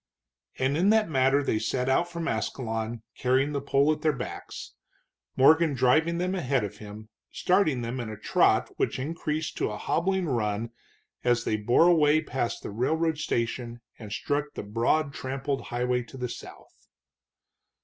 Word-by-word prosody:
And 130 +2 +1
in 180 +6 +3
that 215 -5 +3
manner 135 +1 +3
they 110 - 0
set 125 +3 -1
out 170 +6 +2
from 170 -1 -4
Ascalon, 115 0 -3
carrying 130 +3 +1
the 140 -1 -2
pole 140 +2 +3
at - - -8
their 155 - +3
backs, 125 - -7 0.6
Morgan 155 +2 +5
driving 155 +7 +3
them 180 +2 -1
ahead 140 - 0
of 105 - -6
him, 105 +1 -10 0.2
starting 170 -10 +1
them 120 +3 -4
in 115 -3 -4
a 110 - -7
trot 110 - +2
which - - 0
increased 155 +2 -3
to - - 0
a 105 - -5
hobbling 190 - 0
run 115 -4 -1 0.5
as 120 -2 +2
they - - 0
bore 120 +9 +3
away 155 -3 +5
past 130 -6 -3
the - - -5
railroad 160 +8 0
station 120 -3 -2 0.2
and 105 -3 -9
struck 145 +6 -1
the - - -5
broad 120 +8 0
trampled 135 +2 -3
highway 125 +1 0
to 120 +2 -11
the 125 -1 -3
south. - - -12
130 Hz, 165 wpm, -27 LUFS, 115-155 Hz, 0.6 s, Morgan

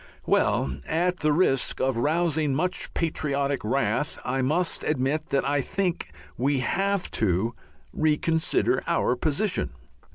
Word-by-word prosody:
Well, 65 0 +1
at 175 +3 +1
the 155 - +2
risk 145 -5 +1
of 130 -1 +1
rousing 155 +2 +1
much 180 +5 -1
patriotic 140 -4 -1
wrath, 140 +5 0
I 135 - 0
must 160 +7 0
admit 150 +3 -1
that 135 0 +1
I 145 0 +2
think 180 - -2 0.3
we 140 +3 +2
have 195 +8 0
to 110 +3 +1 0.4
reconsider 160 +1 +1
our 125 - +2
position. 160 - 0
150 Hz, 125 wpm, -26 LUFS, 135-165 Hz, 0.4 s, the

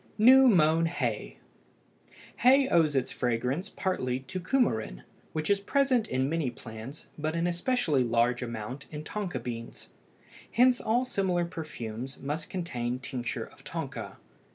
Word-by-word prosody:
NEW 260 +4 +8
MOWN 165 -5 +4
HAY. 165 - -3 1.0
Hay 265 +2 +5
owes 160 -4 +3
its 130 -2 +1
fragrance 125 - -1
partly 130 -10 -1
to 185 +8 -5
cumarin, 175 - 0 0.3
which 155 -1 -2
is 200 -1 +3
present 255 +1 +2
in 130 +1 0
many 160 -3 0
plants, 115 +5 -9
but 155 +2 -1
in 170 0 0
especially 175 - +1
large 120 +1 +2
amount 120 +3 -5
in 150 -1 -6
tonka 195 -5 -3
beans. 115 -1 -7 0.6
Hence 250 +2 +5
all 240 +4 +1
similar 185 -7 0
perfumes 130 -7 -6
must 150 +3 -4
contain 125 -9 -3
tincture 130 -2 -4
of - - -18
tonka. - - -5
155 Hz, 135 wpm, -29 LUFS, 125-195 Hz, 1.0 s, NEW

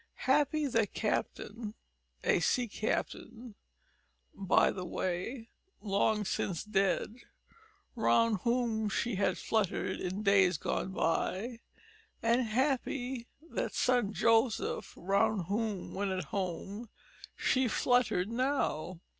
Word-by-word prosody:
Happy 295 +3 +3
that 230 -6 0
captain 215 0 -2 0.5
a - - +3
sea 250 -2 +1
captain, 225 +2 -3 0.8
by 195 -9 +3
the 185 - -5
way, 185 +7 -3 0.3
long 210 +1 +1
since 185 -2 -2
dead 210 +2 0 0.8
round 230 -1 +3
whom 235 -1 0
she 235 +3 -1
had 190 -1 +1
fluttered 195 -3 -1
in 185 +3 -3
days 195 -4 +4
gone 190 - -2
bye, 195 +7 -1 0.6
and 235 +2 +3
happy 255 0 -1 0.2
that - - -3
son 245 -5 +2
Joseph 225 +1 +1
round 200 +2 +1
whom, 210 -2 -2
when 200 +1 -1
at 185 -1 -2
home, 200 +3 -3 0.5
she 260 -1 +2
fluttered 240 -5 +2
now. 230 - -1
220 Hz, 105 wpm, -32 LUFS, 195-240 Hz, 0.8 s, days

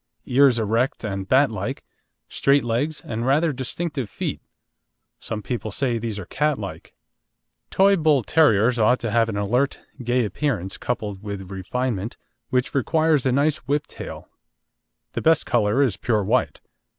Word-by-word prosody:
Ears 130 -1 +4
erect 115 +4 0
and 95 -3 -4
bat 135 +1 +4
like, 100 -2 -4 0.4
straight 140 0 +2
legs 125 +7 -1
and 115 +1 -4
rather 150 +5 +2
distinctive 135 -1 -4
feet; - - -4 0.8
some 105 -2 -5
people 115 0 -3
say 120 +1 -1
these 110 -2 -4
are 100 - -6
cat 150 +7 0
like. 100 -3 -8 0.7
Toy 195 +1 +4
Bull 155 -7 +3
terriers 120 -5 +3
ought 125 +3 +4
to 115 -2 -2
have 115 0 +2
an 100 - -3
alert, 120 +7 0 0.2
gay 120 0 +1
appearance, 105 -6 -2
coupled 105 -5 -3
with 100 -2 -6
refinement, 110 +2 -3 0.3
which 125 -1 0
requires 155 +1 +2
a - - +2
nice 145 +4 +2
whip 145 +1 0
tail. - - -9 0.9
The - - -2
best 160 -1 +3
colour 115 +2 +2
is 125 -8 0
pure 110 -4 0
white. 120 +6 0
125 Hz, 150 wpm, -23 LUFS, 105-140 Hz, 0.9 s, Ears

